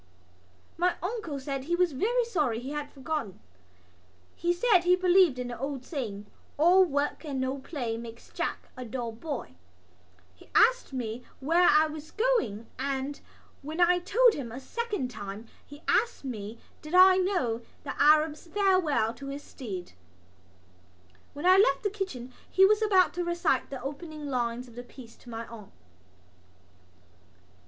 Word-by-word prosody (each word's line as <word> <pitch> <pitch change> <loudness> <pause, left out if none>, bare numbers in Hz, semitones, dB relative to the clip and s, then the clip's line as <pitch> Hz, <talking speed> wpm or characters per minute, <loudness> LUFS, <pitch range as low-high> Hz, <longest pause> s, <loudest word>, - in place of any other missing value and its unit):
My 360 +1 +2
uncle 360 -8 -3
said 270 0 -4
he 345 +3 +1
was 360 -1 +2
very 465 - +1
sorry 300 - 0
he 260 +3 -6
had 295 -1 -4
forgotten. 275 - -4 1.0
He 345 +1 0
said 370 +2 +4
he 355 +1 +4
believed 365 -5 +4
in 250 -1 -4
the 240 - -7
old 270 -1 -4
saying: 220 - -5 0.3
"All 355 +5 +6
work 290 -3 -1
and 280 -4 -4
no 260 +1 -2
play 245 -6 -4
makes 230 0 -10
Jack - - -4
a 255 - -6
dull 240 0 -4
boy." 265 - -6 0.8
He 90 - -19
asked - - +4
me 245 -2 -4 0.2
where 335 +6 +4
I 305 +1 +6
was 310 0 -7
going 430 - 0
and, 275 +1 -2 0.4
when 310 +4 -6
I 350 0 +6
had 355 0 -3
told 480 +2 +5
him 250 - -5
a 250 - -6
second 410 - -3
time 205 0 -7 0.2
he 290 +2 -14
asked 465 -11 +1
me 220 -3 -6 0.2
did 305 +3 -4
I 370 0 +8
know 355 - 0 0.2
The 280 - -4
Arab's 305 +2 +4
Farewell 370 - +2
to 275 +2 -10
his 280 +1 -6
Steed. 195 -9 -7 1.4
When 290 +4 -6
I 370 +1 +7
left 420 +3 +4
the 410 - 0
kitchen 270 - -5 0.2
he 385 - +6
was 425 +2 +4
about 385 -4 +4
to 355 - -2
recite 345 0 0
the 270 - -6
opening 300 +2 -6
lines 245 -2 -2
of 240 - -15
the 245 - -7
piece 245 -1 -13
to 245 - -15
my 230 0 -5
aunt. 220 -4 -12
290 Hz, 165 wpm, -28 LUFS, 250-360 Hz, 1.4 s, I